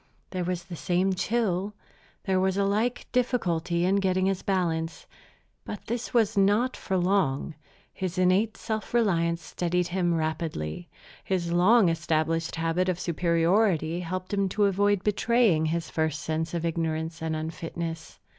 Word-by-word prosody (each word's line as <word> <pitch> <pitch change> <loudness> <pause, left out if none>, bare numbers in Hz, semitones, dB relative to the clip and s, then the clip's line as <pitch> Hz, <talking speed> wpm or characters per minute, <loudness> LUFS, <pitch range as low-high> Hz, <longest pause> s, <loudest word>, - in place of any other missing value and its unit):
There 185 -2 -2
was 175 0 -2
the 175 -1 -8
same 180 +3 +1
chill, 200 -1 -1 0.5
there 190 -1 +1
was 190 0 +1
a 200 - +2
like 220 +5 0
difficulty 175 -9 0
in 195 +2 +3
getting 185 -1 +1
his 195 -1 0
balance. 165 -4 -1 0.6
But 210 - -7
this 240 +1 -3
was 225 -4 +2
not 205 +6 +3
for 190 - -2
long. 180 -6 +1 0.4
His 185 -1 -4
innate 185 +4 +2
self 220 +1 -4
reliance 170 -7 +2
steadied 175 0 -1
him 175 -1 +1
rapidly. 160 - -3 0.3
His 175 -3 -1
long 190 +5 +5
established 165 0 0
habit 165 +3 0
of 180 -1 -1
superiority 170 0 +1
helped 185 +2 -4
him 200 -1 +1
to 205 +2 +2
avoid 200 0 +2
betraying 210 -6 +2
his 165 +1 -2
first 155 -2 -1
sense 160 +1 -2
of 170 0 -2
ignorance 160 0 -2
and 160 -1 -1
unfitness. 165 +1 -5
180 Hz, 145 wpm, -27 LUFS, 165-200 Hz, 0.6 s, long